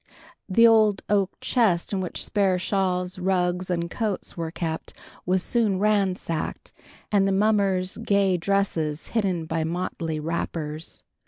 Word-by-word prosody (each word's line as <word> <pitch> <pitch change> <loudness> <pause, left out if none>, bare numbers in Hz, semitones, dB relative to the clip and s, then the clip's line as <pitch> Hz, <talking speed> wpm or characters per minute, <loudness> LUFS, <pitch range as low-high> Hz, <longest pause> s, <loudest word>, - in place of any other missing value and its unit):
The 230 +5 +5
old 215 -3 +5
oak 200 -2 +1
chest 210 -8 +1
in 190 - 0
which 180 - -3
spare 195 -3 +2
shawls, 185 -1 -1
rugs, 180 -1 0
and 170 -1 -1
coats 210 +2 -3
were 165 -1 -3
kept 160 -1 -4 0.3
was 185 0 +2
soon 220 -5 +1
ransacked, 195 -5 -1 0.4
and 200 -2 +3
the - - +1
mummers' 195 -2 +1
gay 200 -2 +2
dresses 170 -5 -1
hidden 190 -7 0
by 160 0 -1
motley 165 -1 -3
wrappers. 160 -1 -4
185 Hz, 135 wpm, -25 LUFS, 170-200 Hz, 0.4 s, The